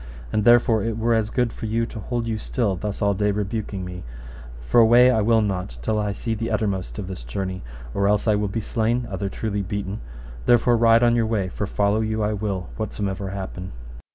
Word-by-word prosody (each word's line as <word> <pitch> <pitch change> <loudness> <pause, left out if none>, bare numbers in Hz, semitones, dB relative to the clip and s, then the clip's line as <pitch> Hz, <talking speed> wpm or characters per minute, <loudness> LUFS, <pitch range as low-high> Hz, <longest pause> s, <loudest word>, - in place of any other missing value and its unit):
And 105 -1 +1
therefore 120 -2 +5
it 115 -1 -2
were 115 +1 +2
as 110 -1 +1
good 125 -1 0
for 110 - -5
you 115 +2 0
to 115 - -8
hold 115 +2 -3
you 110 -1 -2
still 110 -6 -1
thus 105 +2 -4
all 100 0 +3
day 105 +1 +1
rebuking 100 -1 -3
me, 90 0 -7 0.7
for 120 - +5
away 120 +2 +7
will 115 +2 +4
I - - +4
not 90 - -2
till 110 -1 0
I 105 -1 0
see 110 +3 -3
the 115 +1 -3
uttermost 100 -3 -1
of 105 - -4
this 90 -9 -7
journey, 95 +10 -4 0.3
or 100 0 +1
else 105 +2 +2
I 110 - +5
will 105 0 +1
be 105 +3 -3
slain, 115 +3 0
other 95 0 -2
truly 105 0 -2
beaten; 100 +1 -4 0.5
therefore 120 0 +5
ride 115 0 +5
on 120 0 +4
your 115 -2 +2
way, 105 -4 0
for 100 +2 -3
follow 105 +2 +1
you 110 0 -1
I 105 +1 0
will 100 -4 -3
whatsomever 100 -2 -3
happen. 95 -1 -6
105 Hz, 215 wpm, -23 LUFS, 100-115 Hz, 0.7 s, away